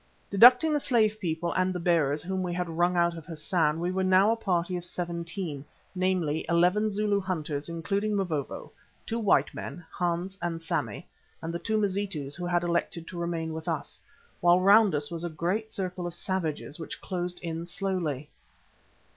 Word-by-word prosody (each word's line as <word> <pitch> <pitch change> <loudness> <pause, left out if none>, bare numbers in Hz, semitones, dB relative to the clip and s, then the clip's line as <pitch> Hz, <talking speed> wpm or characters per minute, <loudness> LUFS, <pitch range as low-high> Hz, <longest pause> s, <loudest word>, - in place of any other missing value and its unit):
Deducting 250 +9 +7
the 295 - +2
slave 220 -6 +2
people 170 -1 -2
and 185 0 +1
the 180 - -3
bearers 155 -4 +2
whom 190 +1 -2
we 180 -1 -2
had 180 0 -2
wrung 175 +2 +1
out 170 0 +3
of 165 -2 -10
Hassan, 160 -1 0
we 175 +2 -1
were 190 +1 0
now 190 +3 +5
a - - +2
party 180 -5 -1
of 175 - -4
seventeen, 170 -3 -4 0.3
namely 180 -5 0
eleven 180 +6 +3
Zulu 205 0 +1
hunters 155 -5 -3
including 195 +6 -1
Mavovo, 165 -8 -3 0.3
two 230 - -2
white 145 -10 +3
men, 175 - -7
Hans 180 +2 -2
and 170 -1 -2
Sammy, 165 - -3 0.3
and 165 +1 -5
the 170 - -2
two 220 +3 0
Mazitus 195 -8 -1
who 175 +2 -4
had 175 0 +1
elected 170 -1 -1
to 175 - -6
remain 165 -2 -2
with 160 +1 -6
us, 160 -4 -3 0.4
while 175 +1 +5
round 200 -1 +6
us 145 +1 -1
was 170 0 -4
a 175 - -2
great 180 +8 -2
circle 185 -3 -4
of 175 - -5
savages 170 -5 -3
which 160 - -6
closed 180 -1 -3
in 165 0 -4
slowly. 175 -7 -2
175 Hz, 180 wpm, -28 LUFS, 165-190 Hz, 0.4 s, Deducting